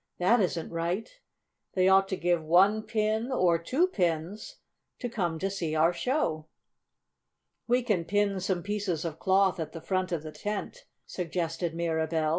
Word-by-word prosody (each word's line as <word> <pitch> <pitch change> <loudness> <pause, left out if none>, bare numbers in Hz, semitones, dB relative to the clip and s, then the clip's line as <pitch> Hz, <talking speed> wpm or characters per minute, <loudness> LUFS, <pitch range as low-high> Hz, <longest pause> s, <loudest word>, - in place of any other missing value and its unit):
"That 220 +7 +4
isn't 175 -4 -1
right. 170 +5 -2 0.7
They 185 -1 +3
ought 195 0 +5
to 190 - -2
give 175 -1 +1
one 190 +7 +4
pin, 220 +2 -1
or 175 -8 +3
two 260 - +2
pins, 180 - -2 0.4
to 245 - -4
come 180 -9 -2
to 190 - -1
see 165 -5 -2
our 165 +3 +4
show." 170 - -1 1.2
"We 245 +1 +2
can 205 -8 0
pin 205 0 +1
some 185 -2 -1
pieces 200 -5 -2
of 160 -1 -5
cloth 190 -1 +3
at 160 - -4
the 165 - -6
front 185 0 -1
end 170 - +1
of 150 - -11
the 155 - -7
tent," 210 - -5 0.2
suggested 165 -1 -3
Mirabell. 160 -1 0
185 Hz, 165 wpm, -28 LUFS, 165-210 Hz, 1.2 s, ought